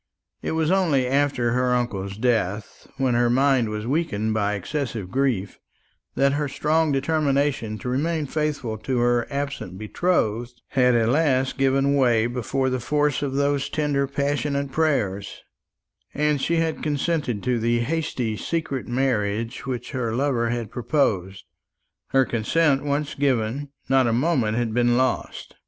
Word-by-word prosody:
It - - -3
was 160 +1 +1
only 165 -9 +2
after 135 -2 +1
her 125 +1 +2
uncle's 100 -5 -2
death, 110 -4 -1
when 130 -2 +1
her 120 0 +3
mind 130 -2 +3
was 105 0 -4
weakened 120 -7 0
by 105 -1 0
excessive 110 -2 -4
grief, 125 -8 -1 0.6
that 140 0 +3
her 145 0 0
strong 155 +3 +1
determination 140 -5 0
to 105 - -7
remain 155 +4 0
faithful 145 -7 -2
to 125 +4 -2
her 120 0 +2
absent 140 -10 -4
betrothed 120 - -1
had 125 -2 +3
at 115 -1 +2
last 135 -2 +2
given 135 +1 +3
way 120 -5 +3
before 130 +2 -1
the 130 - -1
force 150 +3 0
of 140 -2 -2
those 140 0 0
tender 145 -3 0
passionate 140 0 -1
prayers, 110 -11 -1 0.7
and 150 -1 +1
she 170 - +1
had 165 -1 0
consented 145 -6 -1
to 125 -2 +1
the 120 +1 +1
hasty 130 -5 -2
secret 140 0 -3
marriage 115 -2 -1
which 125 -2 -4
her 120 -5 -2
lover 125 -3 +1
had 120 -2 -3
proposed. 100 - -1 0.6
Her 135 -1 +3
consent 135 +6 +1
once 145 0 -1
given, 135 0 0 0.2
not 135 -1 +3
a 115 - +1
moment 120 -5 +1
had 120 -2 -1
been 120 0 +3
lost. 130 -1 -2
130 Hz, 145 wpm, -24 LUFS, 115-145 Hz, 0.7 s, her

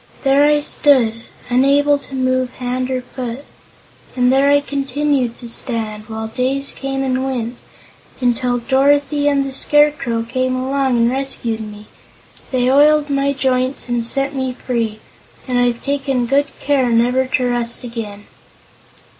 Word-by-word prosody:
There 275 +1 +4
I 295 0 +3
stood, 265 -6 +3 0.3
unable 280 +3 +3
to 275 -1 -10
move 255 -1 0
hand 255 0 -3
or 255 -1 -1
foot. 250 +1 -7 0.7
And 250 0 +3
there 275 +1 +4
I 285 0 +5
continued 280 -3 -1
to 240 - -8
stand 220 -3 -3
while 220 0 -4
days 265 +4 0
came 270 0 -3
and 260 0 -1
went 245 -3 -3 0.6
until 245 0 +1
Dorothy 285 +3 +2
and 280 -1 +2
the 270 - -4
Scarecrow 290 -5 +2
came 255 +2 -1
along 265 0 0
and 235 +1 +3
rescued 255 -4 -2
me. 210 -1 -9 0.6
They 250 -2 +1
oiled 295 +2 +4
my 275 0 +1
joints 260 -1 -1
and 240 -1 0
set 275 +4 -1
me 260 -2 -2
free, 230 -4 -3 0.5
and 250 -1 0
I've 245 -1 0
taken 275 -3 -1
good 280 +4 +2
care 275 -3 +1
never 245 +3 +2
to 250 -1 0
rust 235 0 -2
again." 220 -4 -7
255 Hz, 145 wpm, -18 LUFS, 240-275 Hz, 0.7 s, I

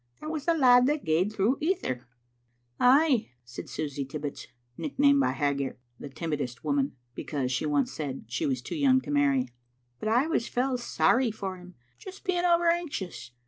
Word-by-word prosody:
"That 310 - -5
was 310 -3 -4
the 335 - +3
lad 250 -4 +6
that 295 0 -1
gaed 165 +6 +2
through 215 +5 +1
ither." 300 - -1 0.7
"Ay," 265 - +4 0.2
said 120 - -9
Susy 145 -2 -3
Tibbits, 145 +1 -6 0.3
nicknamed 280 - +2
by 275 - +3
Haggart 140 -2 -1 0.2
"the 145 - -8
Timidest 145 -4 -4
Woman" 280 0 0 0.2
because 135 -3 -3
she 130 +5 -1
once 145 -2 +1
said 140 -6 -5
she 120 - -2
was 130 -3 -2
too - - -6
young 275 -4 +4
to - - -7
marry, 140 -3 +2 0.2
" 120 0 -45
but 215 - -2
I 245 +5 +3
was 320 -7 -1
fell 250 0 -1
sorry 240 +3 +2
for 195 -3 -5
him, 180 0 -14 0.2
just 380 0 -11
being 360 -2 0
over 345 -1 +3
anxious. 325 - -2
210 Hz, 180 wpm, -28 LUFS, -, 0.7 s, lad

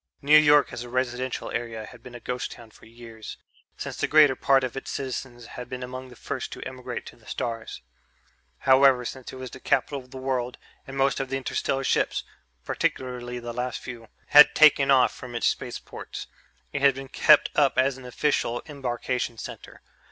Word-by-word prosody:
New 150 +2 +6
York 150 -3 +6
as 120 - -5
a 120 - -10
residential 130 0 -2
area 115 -2 -4
had - - -14
been 125 -1 -11
a - - -7
ghost 125 +1 -4
town 115 -2 -14
for - - -18
years, 115 -1 -10 0.4
since - - -6
the - - 0
greater 150 -3 +6
part 135 0 +3
of 130 -1 -3
its 135 - -6
citizens 125 -2 -5
had 125 +1 -9
been 125 0 -5
among 130 +1 -7
the 125 - -13
first 130 +2 -5
to - - -8
emigrate 130 -1 -6
to - - -11
the - - -22
stars. 115 - -5 0.8
However, 130 -2 +5
since 130 +1 -7
it - - -10
was 130 -1 -7
the - - -10
capital 140 +2 0
of 125 -1 -15
the 130 - -9
world 130 -2 -2 0.3
and 135 0 -7
most 135 +1 +2
of 135 -1 -3
the 135 - -1
interstellar 135 0 -2
ships - - +1 0.4
particularly 125 -1 -2
the 120 -1 -6
last 125 +1 -3
few 120 -3 -9 0.2
had 150 0 +8
taken 150 -3 +6
off 130 -2 +5
from 125 -2 -9
its 120 - -1
spaceports, - - -4 0.5
it 145 - -2
had 140 -1 +5
been 135 0 -7
kept 150 +3 +5
up 140 -3 +3
as 130 +1 +3
an 130 - -12
official 125 -2 0
embarkation 125 -4 -3
center. - - -9
130 Hz, 195 wpm, -26 LUFS, 120-135 Hz, 0.8 s, had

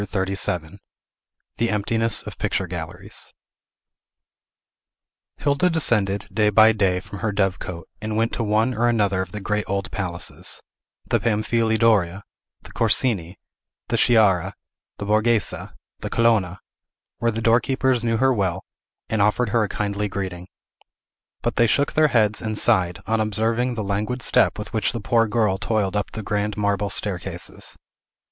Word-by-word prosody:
CHAPTER 95 -1 -2
XXXVII 90 -1 -2 0.8
THE 115 - +1
EMPTINESS 115 +2 0
OF - - -9
PICTURE - - -1
GALLERIES 90 +4 -7 2.0
Hilda 145 +6 +2
descended, 105 - +1
day 105 0 +3
by 110 +2 +6
day, 95 -4 +1
from 100 +1 -10
her 110 - -1
dove 95 -2 0
cote, 85 -2 -7
and 110 0 -3
went 115 +1 +1
to - - -2
one 110 +4 +1
or 120 +1 +2
another 100 -5 +1
of 95 -1 -6
the 105 - -5
great 105 +1 -1
old 100 0 -2
palaces, 90 -3 -3 0.5
the - - +3
Pamfili 110 0 +1
Doria, 100 -5 +2 0.4
the - - -13
Corsini, 105 -6 +1 0.5
the - - +1
Sciarra, 100 -5 +3 0.4
the 100 - -5
Borghese, 110 +1 +2 0.5
the - - -5
Colonna, 105 -6 +2 0.6
where 115 +2 +1
the 115 0 -2
doorkeepers 120 +2 +2
knew 115 -1 +1
her 130 +2 +3
well, 95 -6 -1 0.4
and 110 -2 0
offered 105 +3 +2
her 115 +2 +2
a 105 - -2
kindly 105 +1 -2
greeting. 95 -2 -5 1.0
But - - -1
they 120 - +5
shook 140 +6 +1
their 155 0 +4
heads 110 -6 +2
and 110 -1 -3
sighed, 90 -4 +2
on 115 0 0
observing 115 +3 0
the 110 - -3
languid 105 +5 -2
step - - +3
with 105 +3 -7
which 110 -2 0
the 120 - -3
poor 115 +1 +2
girl 105 -3 +1
toiled 105 -3 0
up 105 - -1
the 110 - -5
grand 105 0 -2
marble 100 -1 0
staircases. 95 -4 -3
105 Hz, 155 wpm, -23 LUFS, 100-115 Hz, 2.0 s, by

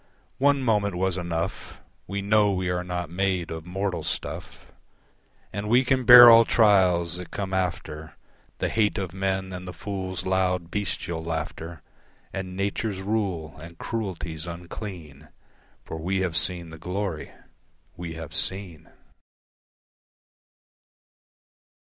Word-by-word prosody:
One 140 0 +3
moment 105 -5 +1
was 95 0 0
enough, 85 -2 -4 0.3
We 100 0 -3
know 105 0 +4
we 95 -1 -1
are 90 0 -1
not 90 -2 -4
made 90 -2 -1
of 80 +1 -6
mortal 95 +1 -2
stuff. - - -4 0.9
And 100 +2 -4
we 125 +3 +5
can 130 -1 +1
bear 120 +1 +12
all 115 0 +9
trials 90 -7 +3
that 90 -1 -8
come 95 -2 -4
after, 80 -4 -3 0.4
The - - -1
hate 110 -1 +1
of 95 -4 -3
men 95 0 -2
and 90 0 -7
the 90 - -6
fool's 95 -2 -4
loud 90 -2 0
bestial 85 -5 -2
laughter 80 0 -5 0.5
And 95 -1 -5
Nature's 100 0 -2
rule 95 -7 -2
and 85 +1 -11
cruelties 85 -8 -4
unclean, 85 -4 -8 0.6
For 80 - -7
we 95 +4 -1
have 90 -3 -1
seen 85 -1 +1
the 80 - -10
Glory 90 -2 -3 0.7
we 85 -1 -6
have 80 -2 -8
seen. 90 -5 -1
95 Hz, 130 wpm, -25 LUFS, 85-100 Hz, 0.9 s, bear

